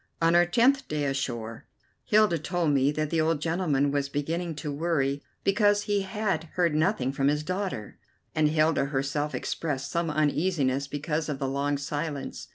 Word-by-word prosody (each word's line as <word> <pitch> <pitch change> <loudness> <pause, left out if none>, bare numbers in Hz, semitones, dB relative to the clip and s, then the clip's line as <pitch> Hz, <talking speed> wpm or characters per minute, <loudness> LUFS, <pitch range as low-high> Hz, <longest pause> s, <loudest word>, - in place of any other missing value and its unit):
On 165 0 +3
our 175 0 +5
tenth 255 +8 +3
day 150 -1 -2
ashore 120 -5 -3 0.4
Hilda 210 -6 +4
told 165 0 0
me 140 0 +3
that 155 0 -2
the 165 -1 +2
old 160 -1 +1
gentleman 155 -4 +1
was 140 -1 -1
beginning 165 +4 -2
to 150 0 -4
worry 145 -3 0 0.2
because 205 +1 +3
he 205 -1 0
had 195 -3 -2
heard 175 -3 +2
nothing 155 -4 +1
from 135 0 0
his 150 +1 +1
daughter, 185 - -4 0.3
and 155 -1 +3
Hilda 155 -1 +2
herself 140 +1 -2
expressed 135 +1 -3
some 170 -1 0
uneasiness 150 -3 +1
because 150 +2 -2
of 145 - -2
the 135 - -2
long 140 +2 0
silence. 145 0 -4
150 Hz, 165 wpm, -27 LUFS, 140-175 Hz, 0.4 s, our